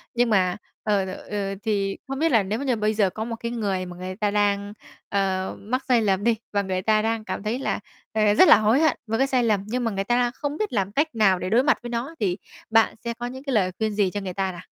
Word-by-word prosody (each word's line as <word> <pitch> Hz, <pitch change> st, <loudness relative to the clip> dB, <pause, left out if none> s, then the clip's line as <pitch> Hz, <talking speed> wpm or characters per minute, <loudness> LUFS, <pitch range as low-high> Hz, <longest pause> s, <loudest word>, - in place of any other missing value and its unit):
Nhưng 240 Hz, 0 st, +2 dB
mà, 185 Hz, -3 st, +2 dB, 0.3 s
ờ, 205 Hz, -3 st, +1 dB
t -, -, -6 dB, 0.2 s
ờ, 200 Hz, -1 st, -2 dB
thì 200 Hz, -3 st, -1 dB
không 270 Hz, 0 st, -4 dB
biết 325 Hz, +1 st, +2 dB
là 225 Hz, -5 st, +4 dB
nếu 210 Hz, +4 st, -2 dB
mà 280 Hz, -, -4 dB
như 255 Hz, -3 st, +2 dB
bây 215 Hz, 0 st, 0 dB
giờ 205 Hz, -3 st, +2 dB
có 215 Hz, +4 st, -5 dB
một 230 Hz, 0 st, -4 dB
cái 235 Hz, +1 st, -5 dB
người 200 Hz, -6 st, -2 dB
mà 180 Hz, 0 st, -9 dB
người 185 Hz, +1 st, -6 dB
ta 205 Hz, 0 st, 0 dB
đang, 205 Hz, 0 st, +1 dB, 0.4 s
ờ, 190 Hz, -1 st, -1 dB
mắc 250 Hz, +6 st, -2 dB
sai 245 Hz, -3 st, +4 dB
lầm 195 Hz, -1 st, +1 dB
đi, 235 Hz, 0 st, +3 dB, 0.2 s
và 205 Hz, -, +2 dB
người 190 Hz, -1 st, -2 dB
ta 215 Hz, +2 st, +3 dB
đang 225 Hz, 0 st, -1 dB
cảm -, -, -4 dB
thấy 220 Hz, +4 st, -1 dB
là, -, -, -1 dB, 0.3 s
ờ, 215 Hz, -1 st, +3 dB
rất 370 Hz, -, +7 dB
là -, -, +9 dB
hối 220 Hz, +6 st, +3 dB
hận 315 Hz, -2 st, +3 dB
với 225 Hz, +1 st, 0 dB
cái 270 Hz, -, +3 dB
sai 255 Hz, -2 st, +2 dB
lầm 210 Hz, -4 st, +1 dB
nhưng 245 Hz, +3 st, -2 dB
mà 230 Hz, -, 0 dB
người 195 Hz, -1 st, -2 dB
ta 240 Hz, +4 st, +1 dB
đang 245 Hz, -1 st, +2 dB
không 290 Hz, 0 st, -4 dB
biết 425 Hz, -4 st, -2 dB
làm 195 Hz, -3 st, 0 dB
cách 295 Hz, +5 st, 0 dB
nào 195 Hz, -4 st, +4 dB
để 185 Hz, -, -3 dB
đối 235 Hz, +4 st, +4 dB
mặt 285 Hz, -, +3 dB
với 240 Hz, -, -5 dB
nó 240 Hz, +7 st, -4 dB
thì 185 Hz, -3 st, 0 dB, 0.3 s
bạn 225 Hz, 0 st, +4 dB
sẽ 235 Hz, -, -1 dB
có 240 Hz, +1 st, -6 dB
những 260 Hz, +2 st, -8 dB
cái 275 Hz, -2 st, -3 dB
lời 185 Hz, -4 st, +2 dB
khuyên 220 Hz, -1 st, 0 dB
gì 200 Hz, -3 st, +2 dB
cho 205 Hz, -, -3 dB
người 185 Hz, -2 st, -5 dB
ta 190 Hz, 0 st, -1 dB
nào? 175 Hz, -, -9 dB
215 Hz, 290 wpm, -24 LUFS, 195-240 Hz, 0.4 s, là